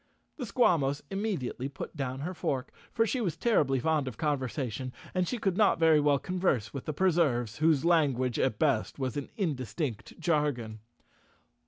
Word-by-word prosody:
The 255 -6 -4
Squawmos 160 - +2
immediately 190 - -2
put 140 - -8
down 135 -2 -3
her 175 +5 -3
fork, 135 -7 -2 0.2
for 225 -1 +2
she 250 +3 -1
was 180 -8 -1
terribly 145 - +2
fond 150 +1 +1
of 120 -4 -6
conversation, 130 -3 -2 0.2
and 185 -1 +1
she 250 - -2
could 195 -5 0
not 210 0 +4
very 160 -2 +5
well 145 -1 +3
converse 175 - -1
with 140 - -6
the - - -1
Preserves, 140 - +2
whose 155 -2 +3
language 135 -8 +2
at 120 -5 +1
best 135 -7 +1
was 130 -3 -2
an 145 -2 -4
indistinct 140 - -3
jargon. 145 -9 0
145 Hz, 165 wpm, -29 LUFS, 130-175 Hz, 0.2 s, very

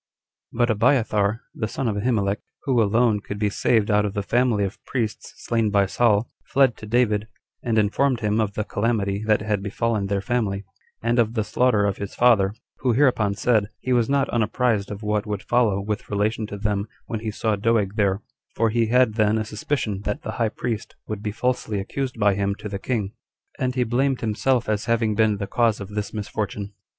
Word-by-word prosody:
8. - - -8
But 120 0 +3
Abiathar, 110 -2 +2
the 110 - -3
son 125 +3 -3
of 105 - 0
Ahimelech, 105 -2 0 0.2
who 130 -5 +2
alone 110 0 +3
could 100 0 -6
be 105 -1 0
saved 110 0 +2
out 105 0 +4
of 105 0 -3
the 100 - -1
family 120 -1 +2
of 100 +1 -5
priests 115 -5 -3
slain 115 -2 +1
by 100 -1 +3
Saul, 110 +2 +2 0.2
fled 135 -3 +3
to 110 - -9
David, 110 -2 +2 0.3
and 115 -3 0
informed 120 +4 +2
him 105 +1 +1
of 105 -2 -1
the 105 - -1
calamity 105 -2 -1
that 110 -1 +3
had 105 -2 0
befallen 105 0 -1
their 100 0 0
family, 100 -3 -1 0.4
and 120 +1 +2
of 115 0 +2
the 110 - +1
slaughter 110 -2 +2
of 100 -2 0
his 100 0 -6
father; 110 -5 +4 0.2
who 125 -2 +1
hereupon 115 -6 +3
said, 110 -1 +2
He 130 - -1
was 120 -1 +2
not 140 -1 +2
unapprised 115 -2 +1
of 105 +1 -7
what 105 0 -1
would 105 -1 -3
follow 115 -5 +2
with 105 +4 -4
relation 105 +2 0
to 100 - -6
them 100 0 -1 0.2
when 115 - -4
he 110 0 -4
saw 110 +1 0
Doeg 105 -1 +1
there; 100 -2 +1 0.3
for 115 -1 +2
he 115 0 +2
had 125 -1 +4
then 110 0 +2
a 110 - -1
suspicion 105 -2 -2
that 105 - -2
the - - -4
high 115 0 0
priest 115 0 -4
would 105 -2 -4
be 105 -1 -3
falsely 115 -2 -1
accused 125 +5 -4
by 100 -1 +4
him 100 0 -1
to 105 - -7
the 100 -1 -4
king, 105 -4 -2 0.5
and 130 -1 -1
he 125 - +2
blamed 130 +3 0
himself 120 +3 +1
as 105 0 -1
having 115 -2 +1
been 105 -1 +2
the 100 - -3
cause 115 +1 +1
of 100 -1 -7
this 105 0 -4
misfortune. 105 -1 -4
110 Hz, 205 wpm, -23 LUFS, 105-120 Hz, 0.5 s, out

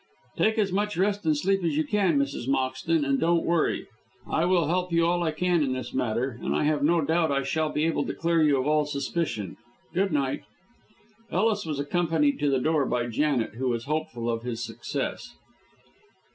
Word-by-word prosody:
"Take 220 +1 +2
as 200 -3 +1
much 205 +1 -1
rest 200 -1 0
and 155 -1 +3
sleep 195 +4 +1
as 160 -3 0
you 155 - +3
can, 185 -1 +1
Mrs. 140 -3 -1
Moxton, 135 +4 0
and 135 0 +1
don't 170 0 +2
worry. 170 -2 +1 0.4
I 160 - +1
will 175 -2 +3
help 180 +2 0
you 165 0 +3
all 175 +1 +1
I 170 - +1
can 175 +2 +1
in 135 -3 0
this 130 0 -5
matter, 120 +2 -1
and - - -1
I - - +1
have 150 -1 +1
no 165 +3 +3
doubt 160 +1 +1
I 140 0 +1
shall 155 +3 0
be 150 +1 0
able 165 - 0
to - - -3
clear 165 -1 +1
you 150 -3 +4
of 130 - -1
all 150 0 +2
suspicion. 140 - -3 0.4
Good 195 +1 +1
night." 140 -3 0 0.9
Ellis 210 -1 +1
was 150 -3 -3
accompanied 155 -1 +1
to 145 -1 +1
the 135 - +2
door 150 0 +1
by 120 -1 0
Janet, 125 -3 0
who 130 -1 0
was 120 -1 -1
hopeful 140 -6 -3
of 115 -1 -1
his 120 -1 -4
success. - - -5
155 Hz, 200 wpm, -26 LUFS, 135-170 Hz, 0.9 s, you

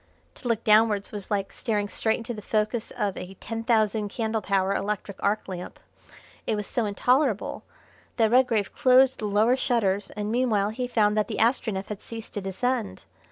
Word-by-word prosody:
To 250 - -8
look 230 -1 0
downwards 215 -2 +3
was 205 -2 -5
like 200 -2 -2
staring 210 -4 -1
straight 220 +2 0
into 235 +1 -5
the 215 - -7
focus 215 +2 -1
of 200 -2 -2
a 190 +1 -8
ten 225 +3 -5
thousand 220 -2 +1
candle 220 0 -2
power 195 -1 +1
electric 200 -1 -3
arc 205 +2 0
lamp. 180 -2 -7 0.7
It - - +1
was 210 -1 -3
so 235 +2 -1
intolerable 245 +2 +1 0.6
that 225 -2 +3
Redgrave 235 -5 +3
closed 260 +1 +4
the 215 - -3
lower 210 +4 +3
shutters, 205 -6 0
and 210 0 -4
meanwhile 225 -5 +1
he 250 +3 -3
found 210 -3 +2
that 210 - +2
the - - -4
Astronef 220 -5 +1
had 210 -2 -6
ceased 230 -1 -8
to 205 - -3
descend. 220 +4 -2
215 Hz, 180 wpm, -26 LUFS, 205-230 Hz, 0.7 s, closed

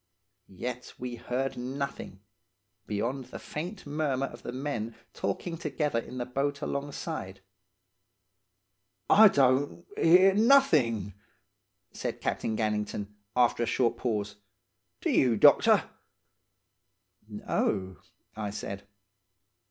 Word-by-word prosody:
"Yet 125 +6 -6
we 125 -1 -5
heard 125 +3 -3
nothing, 130 -6 -5 0.7
beyond 120 +6 -2
the 125 - -9
faint 180 +7 -6
murmur 145 -2 -1
of - - -10
the - - -6
men 125 -4 -4 0.2
talking 165 - -3
together 150 -7 -1
in 125 +2 -8
the 120 - -2
boat 140 +3 -2
alongside. 140 0 -4 1.7
"'I 220 +1 +9
don't, 140 +1 +2
hear 185 +4 +6
nothing,' 155 - +4 0.8
said - - -4
Captain 110 -1 -2
Gannington, 105 -1 -2 0.2
after 120 -1 +3
a 120 - +1
short 120 -2 +1
pause. 105 -4 -2 0.6
'Do - - 0
you, 120 -4 +3
doctor?' - - +6 1.5
"'No,' 95 -3 -2 0.4
I 105 -1 -3
said. 100 -1 -6
125 Hz, 105 wpm, -29 LUFS, 110-145 Hz, 1.7 s, I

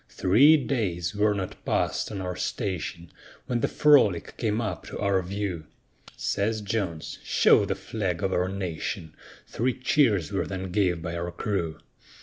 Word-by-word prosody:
Three 135 +12 +5
days 95 - -1
were 105 0 +2
not 95 -2 -5
passed - - 0
on 100 -2 -4
our 90 -1 -3
station, 85 -3 -4 0.3
When 120 -1 -1
the - - +1
Frolic 135 - +4
came 110 -1 -1
up 105 -7 -3
to - - -6
our 100 -2 +1
view; 90 -3 -4 0.5
Says 110 +2 -1
Jones, 100 -6 -3
"Show - - +4
the - - -1
flag 95 -6 -3
of 95 -1 0
our 90 +1 +1
nation;" 85 -4 -4 0.3
Three 125 +3 -1
cheers 120 - +2
were 100 - -1
then 95 -1 -5
gave 90 -4 +1
by 85 0 -4
our 85 +1 -3
crew. 85 -7 -2
95 Hz, 155 wpm, -26 LUFS, 90-110 Hz, 0.5 s, Three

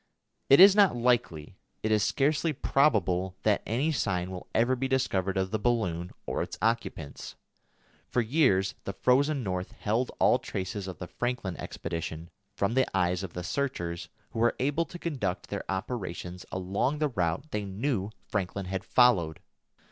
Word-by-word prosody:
It 135 - +8
is 195 +1 +10
not 200 -9 +5
likely; 115 -10 0 0.3
it 110 - 0
is 105 -1 +4
scarcely 150 +7 +1
probable 95 - +2
that 105 -2 +3
any 130 +9 +1
sign 90 - -1
will 90 -1 -7
ever 120 +3 +2
be 135 +1 -1
discovered 100 -8 0
of 95 0 0
the 110 - 0
balloon 95 -7 0 0.2
or - - -2
its - - -5
occupants. 110 -10 -2 0.7
For - - +1
years 110 -6 +3
the 100 - -3
frozen 135 +5 +2
North 90 -2 -3
held 115 +5 -1
all - - +5
traces 95 +1 -4
of 95 - -6
the 90 - -6
Franklin 100 0 -3
expedition 85 0 -5 0.2
from 100 +2 0
the 130 +1 +3
eyes 90 0 +1
of 95 -4 -6
the 90 - -5
searchers 85 -8 -3 0.2
who 115 - -4
were 120 +1 +3
able 145 +5 +1
to 175 - -9
conduct 125 - -3
their - - -4
operations 90 -3 -4
along 100 +10 -1
the 150 -1 +1
route 95 - -2
they 105 -1 -2
knew 100 +1 -2 0.2
Franklin 100 -1 -2
had 95 +1 -3
followed. 95 -13 +3
105 Hz, 165 wpm, -29 LUFS, 90-130 Hz, 0.7 s, is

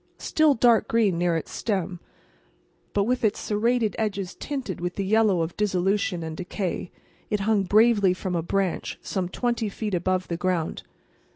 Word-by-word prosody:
Still 310 -3 +3
dark 230 -1 +4
green 210 -7 +2
near 175 -1 +2
its 160 - -6
stem, 190 -4 -2 0.9
but 200 - +2
with 250 +4 0
its 215 -1 +2
serrated 225 +1 +1
edges 200 -4 -2
tinted 260 -12 -5
with 175 0 -3
the 195 - -2
yellow 210 -3 +3
of 165 +1 -3
dissolution 190 -2 0
and 160 -1 -5
decay, 180 0 -4 0.4
it 210 -1 0
hung 210 0 +2
bravely 205 -2 +4
from 185 -1 -3
a 170 - +1
branch 190 +1 -1
some 185 -3 -2
twenty 235 +1 -1
feet 210 0 -4
above 185 +1 0
the 170 - -3
ground. 180 -2 -1
195 Hz, 165 wpm, -25 LUFS, 180-220 Hz, 0.9 s, dark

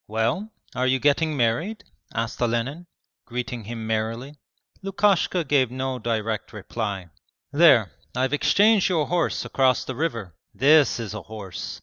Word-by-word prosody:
'Well? 115 - -1 0.2
Are 125 +1 0
you 130 +1 +3
getting 145 +3 +2
married?' 125 - 0 0.3
asked 115 +2 -3
Olenin, 125 +8 -1 0.4
greeting 120 -2 -4
him 115 0 -6
merrily. 115 +6 -3 0.4
Lukashka 195 -2 +2
gave 135 -4 +2
no 130 0 -3
direct 110 -2 -2
reply. 100 -4 -5 0.4
'There, 140 - +5 0.2
I've 130 +2 0
exchanged 205 +7 +4
your 165 -5 +1
horse 175 -1 0
across 130 -2 +2
the 130 - -4
river. 115 - -3 0.2
This 145 -1 +5
is 110 -3 -5
a 110 - -5
horse! 100 -5 -7
125 Hz, 135 wpm, -24 LUFS, 115-155 Hz, 0.4 s, There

